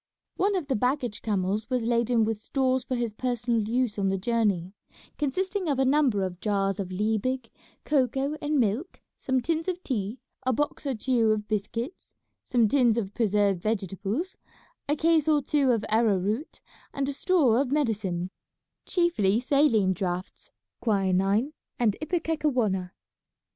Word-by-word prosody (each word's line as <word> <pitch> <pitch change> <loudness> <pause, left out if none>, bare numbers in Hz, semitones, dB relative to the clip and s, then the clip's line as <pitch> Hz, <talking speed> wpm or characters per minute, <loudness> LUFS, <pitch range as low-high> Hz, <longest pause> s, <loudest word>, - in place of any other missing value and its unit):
One 400 +1 +1
of 360 -5 -1
the 270 -2 0
baggage 250 -1 -1
camels 205 +1 -1
was 250 -2 0
laden 235 0 +2
with 220 -1 -2
stores 260 +1 0
for 255 - -3
his 235 -3 -2
personal 240 -1 0
use 240 -3 0
on 195 -1 +1
the 195 - 0
journey, 200 -4 0 0.5
consisting 370 +5 -1
of 280 - +1
a 265 - +2
number 260 -7 +3
of 180 -1 -4
jars 195 -1 0
of 190 -2 -4
Liebig, 220 +5 -1 0.3
cocoa, 275 +1 +1
and 295 0 +1
milk, 240 - -1 0.2
some 260 -1 0
tins 325 +5 -1
of 365 0 -3
tea, 220 -2 -2 0.2
a 255 - +1
box 295 +2 -2
or 270 - 0
two 230 0 +2
of 215 -1 0
biscuits, 230 - -4 0.3
some 240 -4 +2
tins 240 -2 +3
of 205 -3 -2
preserved 205 -4 +1
vegetables, 215 - -2 0.5
a 295 - +3
case 320 -1 +2
or 305 -1 +4
two 280 -1 +1
of 230 -4 +2
arrow 220 -2 +3
root, 210 - -3 0.3
and 275 -1 -1
a 285 - -2
store 275 -7 +3
of 275 -2 -2
medicine, 200 -11 -1 0.6
chiefly 285 - +2
saline 245 -7 +3
draughts, 180 0 -4 0.3
quinine, 200 +4 +1 0.2
and 220 -4 +2
ipecacuanha. 295 - 0
235 Hz, 155 wpm, -27 LUFS, 205-280 Hz, 0.6 s, or